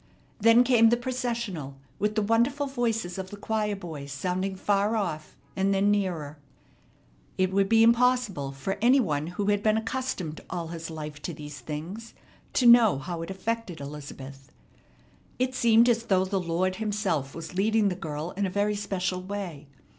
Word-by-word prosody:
Then 230 Hz, +3 st, +6 dB
came 235 Hz, -3 st, +5 dB
the 240 Hz, -, +3 dB
processional, 235 Hz, -, -3 dB, 0.2 s
with 210 Hz, +1 st, 0 dB
the 215 Hz, -, +2 dB
wonderful 240 Hz, +7 st, +2 dB
voices 225 Hz, -8 st, -2 dB
of 190 Hz, 0 st, -5 dB
the 205 Hz, -, -9 dB
choir 210 Hz, 0 st, -1 dB
boys 155 Hz, -7 st, -8 dB
sounding 185 Hz, +7 st, -2 dB
far 205 Hz, +3 st, +1 dB
off, 155 Hz, -8 st, -3 dB, 0.2 s
and 195 Hz, +1 st, +1 dB
then 200 Hz, +1 st, +3 dB
nearer. 170 Hz, -8 st, -2 dB, 1.0 s
It 185 Hz, 0 st, +1 dB
would 195 Hz, 0 st, +2 dB
be 225 Hz, 0 st, +6 dB
impossible 235 Hz, -, +3 dB
for 140 Hz, +9 st, -4 dB
any 250 Hz, +4 st, +5 dB
one 155 Hz, -, 0 dB
who 180 Hz, +4 st, -3 dB
had 205 Hz, 0 st, +2 dB
been 215 Hz, 0 st, +3 dB
accustomed 220 Hz, -9 st, -3 dB
all 170 Hz, -2 st, -4 dB
his 165 Hz, -1 st, -6 dB
life 150 Hz, -2 st, -7 dB
to 170 Hz, -, -5 dB
these 150 Hz, -1 st, -9 dB
things 165 Hz, -, -7 dB, 0.4 s
to 250 Hz, -, +2 dB
know 235 Hz, -, +7 dB
how 170 Hz, +4 st, -5 dB
it 165 Hz, -, -6 dB
affected 195 Hz, -2 st, -3 dB
Elizabeth. 140 Hz, -1 st, -9 dB, 0.9 s
It 255 Hz, +1 st, 0 dB
seemed 235 Hz, -1 st, +5 dB
as 230 Hz, -1 st, +2 dB
though 190 Hz, -3 st, +2 dB
the 190 Hz, 0 st, -1 dB
Lord 180 Hz, +2 st, -1 dB
Himself 200 Hz, -10 st, -1 dB
was 165 Hz, +1 st, -7 dB
leading 210 Hz, +2 st, +2 dB
the 180 Hz, -, -3 dB
girl 155 Hz, -1 st, -5 dB
in 200 Hz, 0 st, -1 dB
a -, -, -3 dB
very 205 Hz, +2 st, 0 dB
special 190 Hz, -2 st, -2 dB
way. 185 Hz, -7 st, -6 dB
195 Hz, 170 wpm, -27 LUFS, 165-225 Hz, 1.0 s, know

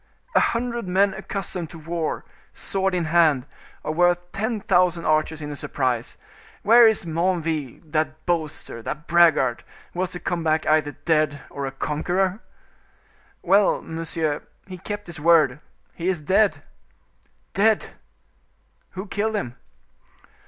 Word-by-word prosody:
"A -, -, +5 dB
hundred 235 Hz, -2 st, -1 dB
men 195 Hz, +2 st, +3 dB
accustomed 180 Hz, -4 st, -4 dB
to 165 Hz, -, -10 dB
war, 165 Hz, 0 st, -3 dB, 0.3 s
sword 195 Hz, -1 st, 0 dB
in 175 Hz, -2 st, 0 dB
hand, 155 Hz, -5 st, +3 dB, 0.4 s
are -, -, -1 dB
worth 175 Hz, +2 st, +2 dB
ten 220 Hz, +2 st, -2 dB
thousand 180 Hz, -3 st, +2 dB
archers 155 Hz, 0 st, +1 dB
in 150 Hz, -, -5 dB
a -, -, -5 dB
surprise. 130 Hz, -4 st, -2 dB, 0.5 s
Where 230 Hz, +2 st, +8 dB
is 220 Hz, -5 st, +2 dB
Menneville, 165 Hz, -5 st, -1 dB
that 155 Hz, 0 st, -1 dB
boaster, 155 Hz, -8 st, -2 dB
that 150 Hz, +7 st, -5 dB
braggart, 160 Hz, -8 st, +4 dB, 0.3 s
who 175 Hz, -, -6 dB
was 185 Hz, -1 st, 0 dB
to 175 Hz, -, -5 dB
come 175 Hz, -3 st, -2 dB
back 155 Hz, 0 st, +1 dB
either 155 Hz, -1 st, +2 dB
dead 155 Hz, -3 st, +1 dB
or 140 Hz, -1 st, -4 dB
a -, -, -4 dB
conqueror?" 180 Hz, +8 st, -1 dB, 1.0 s
"Well, 200 Hz, 0 st, +3 dB
monsieur, 160 Hz, -2 st, -2 dB, 0.2 s
he 185 Hz, -2 st, -9 dB
kept 205 Hz, +2 st, -5 dB
his 170 Hz, -2 st, -7 dB
word. 155 Hz, -4 st, +4 dB, 0.3 s
He 170 Hz, -, -4 dB
is 185 Hz, -3 st, +1 dB
dead!" 195 Hz, +7 st, +2 dB, 0.9 s
"Dead! 215 Hz, +2 st, +2 dB, 1.0 s
Who 190 Hz, +2 st, -5 dB
killed 215 Hz, +2 st, -1 dB
him?" 125 Hz, -, -3 dB
170 Hz, 140 wpm, -23 LUFS, 155-190 Hz, 1.0 s, Where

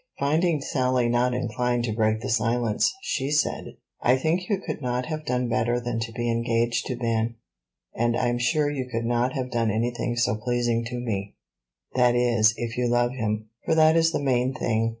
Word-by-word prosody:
Finding 155 Hz, +2 st, +1 dB
Sally 130 Hz, -3 st, +1 dB
not 120 Hz, +1 st, +1 dB
inclined 125 Hz, 0 st, -1 dB
to 115 Hz, -2 st, -1 dB
break 110 Hz, 0 st, +1 dB
the 130 Hz, -, -4 dB
silence, 115 Hz, -1 st, +1 dB
she 135 Hz, -, -1 dB
said, 150 Hz, 0 st, -1 dB, 0.2 s
"I 125 Hz, +2 st, +4 dB
think 170 Hz, +6 st, -1 dB
you 200 Hz, -3 st, +1 dB
could 175 Hz, -, -5 dB
not 125 Hz, -1 st, -1 dB
have 155 Hz, -1 st, -5 dB
done 125 Hz, 0 st, 0 dB
better 120 Hz, 0 st, +1 dB
than 120 Hz, -1 st, -3 dB
to 115 Hz, 0 st, -4 dB
be 120 Hz, +1 st, -3 dB
engaged 115 Hz, 0 st, 0 dB
to 130 Hz, -, -2 dB
Ben; 115 Hz, -1 st, -1 dB, 0.6 s
and 120 Hz, 0 st, +1 dB
I'm 120 Hz, -1 st, 0 dB
sure 145 Hz, +5 st, +2 dB
you 130 Hz, -3 st, -3 dB
could 115 Hz, 0 st, -2 dB
not 120 Hz, +2 st, +1 dB
have 130 Hz, -2 st, -3 dB
done 115 Hz, -2 st, +1 dB
anything 120 Hz, +2 st, -1 dB
so 115 Hz, -3 st, +1 dB
pleasing 120 Hz, 0 st, 0 dB
to 125 Hz, +1 st, -5 dB
me; 100 Hz, -4 st, -4 dB, 0.6 s
that 125 Hz, -1 st, +3 dB
is, 115 Hz, -3 st, +3 dB
if 120 Hz, 0 st, -4 dB
you 125 Hz, -, +1 dB
love 120 Hz, 0 st, +2 dB
him, 110 Hz, -3 st, -3 dB
for 160 Hz, -, +1 dB
that 160 Hz, 0 st, +5 dB
is 165 Hz, 0 st, +4 dB
the -, -, -1 dB
main 130 Hz, -1 st, +1 dB
thing. 115 Hz, -1 st, 0 dB
120 Hz, 195 wpm, -25 LUFS, 115-130 Hz, 0.6 s, that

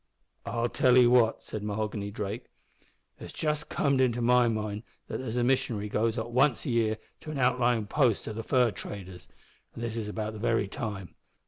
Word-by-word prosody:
"I'll 120 Hz, 0 st, 0 dB
tell 125 Hz, +1 st, +3 dB
'ee 125 Hz, -, +8 dB
what," 120 Hz, -2 st, +4 dB
said 110 Hz, -, -6 dB
Mahoghany 105 Hz, 0 st, -3 dB
Drake, 105 Hz, +3 st, -5 dB, 0.7 s
"it's -, -, -8 dB
just 150 Hz, -1 st, -2 dB
comed 140 Hz, -2 st, +1 dB
into 120 Hz, -2 st, +2 dB
my 125 Hz, +1 st, +4 dB
mind 105 Hz, -2 st, -2 dB, 0.2 s
that -, -, -5 dB
there's 125 Hz, -2 st, -4 dB
a 120 Hz, -, +2 dB
missionary 120 Hz, -5 st, 0 dB
goes 110 Hz, +2 st, 0 dB
up 115 Hz, +1 st, -3 dB
once 130 Hz, +2 st, +2 dB
a 135 Hz, -, -1 dB
year 110 Hz, -2 st, +1 dB, 0.2 s
to -, -, -10 dB
an 155 Hz, -, -4 dB
outlyin' 125 Hz, -4 st, +2 dB
post 125 Hz, -4 st, +1 dB
o' 110 Hz, -, -3 dB
the 115 Hz, -, -4 dB
fur 125 Hz, 0 st, +2 dB
traders, 95 Hz, -2 st, -8 dB, 0.5 s
an' -, -, -7 dB
this 115 Hz, -1 st, -3 dB
is 110 Hz, -2 st, -3 dB
about 110 Hz, +1 st, -4 dB
the 110 Hz, -, -8 dB
very 115 Hz, -2 st, +1 dB
time. 100 Hz, -, -5 dB
115 Hz, 195 wpm, -29 LUFS, 105-125 Hz, 0.7 s, ee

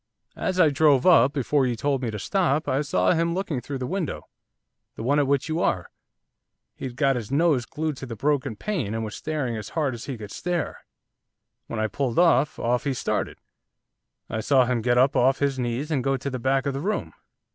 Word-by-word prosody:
As 185 Hz, 0 st, -1 dB
I 160 Hz, -, +6 dB
drove 140 Hz, -2 st, +4 dB
up, 145 Hz, -8 st, +6 dB
before 140 Hz, -1 st, +1 dB
you 120 Hz, -, -1 dB
told 135 Hz, +3 st, -1 dB
me 120 Hz, -, -2 dB
to 105 Hz, -, -4 dB
stop, 160 Hz, -, 0 dB
I 135 Hz, -, +1 dB
saw 95 Hz, -11 st, +2 dB
him 170 Hz, +1 st, +1 dB
looking 170 Hz, -9 st, -2 dB
through 135 Hz, +3 st, -5 dB
the 130 Hz, -, -4 dB
window, 180 Hz, +2 st, -3 dB, 0.7 s
the -, -, -6 dB
one 140 Hz, +5 st, +2 dB
at 145 Hz, -, +2 dB
which 140 Hz, 0 st, +1 dB
you 160 Hz, +1 st, -1 dB
are. 90 Hz, -, 0 dB, 0.8 s
He'd 130 Hz, -2 st, -6 dB
got 135 Hz, 0 st, +2 dB
his 115 Hz, -4 st, -4 dB
nose 145 Hz, -4 st, +2 dB
glued 155 Hz, -2 st, -3 dB
to 135 Hz, -, -7 dB
the 115 Hz, -, -6 dB
broken 135 Hz, -2 st, 0 dB
pane, 130 Hz, -, -3 dB
and 115 Hz, -, -2 dB
was 105 Hz, -, -6 dB
staring 150 Hz, -7 st, -3 dB
as 105 Hz, -2 st, -6 dB
hard 145 Hz, -5 st, +1 dB
as 115 Hz, -, -7 dB
he 135 Hz, -4 st, -5 dB
could 105 Hz, -2 st, -9 dB
stare. 175 Hz, -3 st, -3 dB, 0.9 s
When 115 Hz, -, -4 dB
I 110 Hz, -, +1 dB
pulled 120 Hz, +3 st, -2 dB
up, 165 Hz, -3 st, +4 dB
off 125 Hz, +3 st, 0 dB
he 140 Hz, -2 st, 0 dB
started, -, -, -2 dB, 0.9 s
I 110 Hz, -, -3 dB
saw 130 Hz, +2 st, +4 dB
him 120 Hz, -1 st, 0 dB
get 120 Hz, +1 st, +2 dB
up 130 Hz, +2 st, +4 dB
off 130 Hz, +2 st, +4 dB
his 140 Hz, -2 st, 0 dB
knees, 125 Hz, +5 st, -2 dB
and 135 Hz, -5 st, 0 dB
go 135 Hz, 0 st, +1 dB
to 135 Hz, +2 st, -4 dB
the 130 Hz, -, -4 dB
back 135 Hz, +2 st, +1 dB
of 140 Hz, -, -1 dB
the 135 Hz, -, -3 dB
room. 210 Hz, +6 st, -2 dB
135 Hz, 220 wpm, -25 LUFS, 120-150 Hz, 0.9 s, I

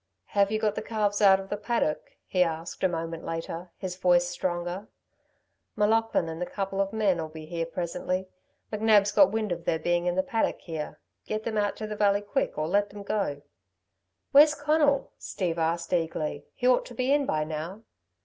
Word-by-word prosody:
"Have 200 Hz, 0 st, +3 dB
you 215 Hz, -, +1 dB
got 215 Hz, -1 st, +1 dB
the -, -, -4 dB
calves 210 Hz, -2 st, -1 dB
out 195 Hz, -2 st, +7 dB
of 195 Hz, 0 st, -8 dB
the 205 Hz, -, -2 dB
paddock?" 210 Hz, -7 st, -2 dB
he 185 Hz, -, 0 dB
asked 165 Hz, 0 st, -1 dB
a -, -, +6 dB
moment 165 Hz, -1 st, -4 dB
later, 165 Hz, +2 st, -5 dB
his 185 Hz, -2 st, -5 dB
voice 175 Hz, -1 st, +4 dB
stronger. 175 Hz, +3 st, -3 dB, 0.9 s
"M'Laughlin 220 Hz, -3 st, +2 dB
and 165 Hz, +1 st, -6 dB
a -, -, 0 dB
couple 195 Hz, -1 st, -2 dB
of 195 Hz, 0 st, -1 dB
men'll 190 Hz, -7 st, +1 dB
be 155 Hz, 0 st, -9 dB
here 165 Hz, 0 st, -3 dB
presently. 180 Hz, +2 st, -3 dB, 0.5 s
McNab's 210 Hz, -1 st, +4 dB
got 195 Hz, -2 st, +6 dB
wind 215 Hz, -2 st, -1 dB
of 170 Hz, -1 st, -3 dB
their 160 Hz, -, +1 dB
being 175 Hz, +2 st, 0 dB
in 175 Hz, -, +1 dB
the 185 Hz, -, +2 dB
paddock, 225 Hz, -, 0 dB
here. 160 Hz, -3 st, -6 dB, 0.3 s
Get 215 Hz, 0 st, -2 dB
them 225 Hz, -1 st, -3 dB
out 205 Hz, -1 st, 0 dB
to 215 Hz, -, -5 dB
the 215 Hz, 0 st, -5 dB
valley 205 Hz, -1 st, +3 dB
quick, 205 Hz, -, -2 dB
or 155 Hz, 0 st, -1 dB
let 205 Hz, +4 st, +2 dB
them 205 Hz, 0 st, -9 dB
go." 195 Hz, -9 st, -2 dB, 0.9 s
"Where's 300 Hz, +2 st, +7 dB
Conal?" 290 Hz, -1 st, +2 dB
Steve 170 Hz, -4 st, -3 dB
asked 165 Hz, +2 st, -1 dB
eagerly; 160 Hz, -4 st, -1 dB
"he 250 Hz, -, -4 dB
ought 255 Hz, -, +3 dB
to 245 Hz, -, -11 dB
be 255 Hz, +3 st, 0 dB
in 285 Hz, -2 st, +2 dB
by 155 Hz, 0 st, +1 dB
now." 160 Hz, +7 st, -5 dB
190 Hz, 195 wpm, -27 LUFS, 170-215 Hz, 0.9 s, out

